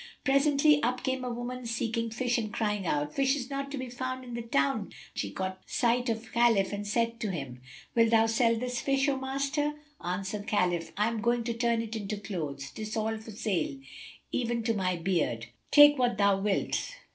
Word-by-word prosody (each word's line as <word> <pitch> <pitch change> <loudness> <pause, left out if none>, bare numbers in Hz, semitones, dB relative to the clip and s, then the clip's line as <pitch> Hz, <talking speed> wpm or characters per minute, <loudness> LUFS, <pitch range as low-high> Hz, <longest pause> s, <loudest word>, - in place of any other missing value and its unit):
Presently, 285 +1 +4
up 250 +2 0
came 260 0 -1
a 250 - -2
woman 245 +1 -5
seeking 230 0 -1
fish 245 +2 0
and 215 -2 -3
crying 210 -4 -1
out, 150 0 0
"Fish 270 0 +2
is 260 -2 -5
not 275 0 -3
to 280 - -5
be 260 -1 -4
found 255 +1 -4
in 245 -1 -8
the 235 - -3
town." 200 -1 0 0.2
She - - -3
caught 185 0 -4
sight 245 0 +1
of 225 0 -3
Khalif, 230 -5 +3
and 205 0 -4
said 230 +2 0
to 215 - -2
him, 135 -8 -5 0.3
"Wilt 230 -1 +4
thou 225 -1 +5
sell 230 +1 +3
this 245 +1 -2
fish, 275 0 +2
O 280 - +2
Master?" 275 +3 -1 0.3
Answered 195 +4 -3
Khalif, 180 -5 +1
"I 210 +1 +3
am 230 -1 -2
going 235 +1 +1
to 235 0 -2
turn 230 0 +1
it 225 0 -6
into 210 -1 -3
clothes, 155 -9 -5
'tis 215 0 -5
all 220 0 -1
for 220 - -12
sale, 200 -9 -2 0.5
even 235 -1 -1
to 230 0 +1
my 185 -3 0
beard.[FN#275] 165 -10 -1 0.2
Take 290 -1 +8
what 245 -4 +2
thou 200 -1 +4
wilt." 210 - -1
230 Hz, 200 wpm, -29 LUFS, 200-250 Hz, 0.5 s, Take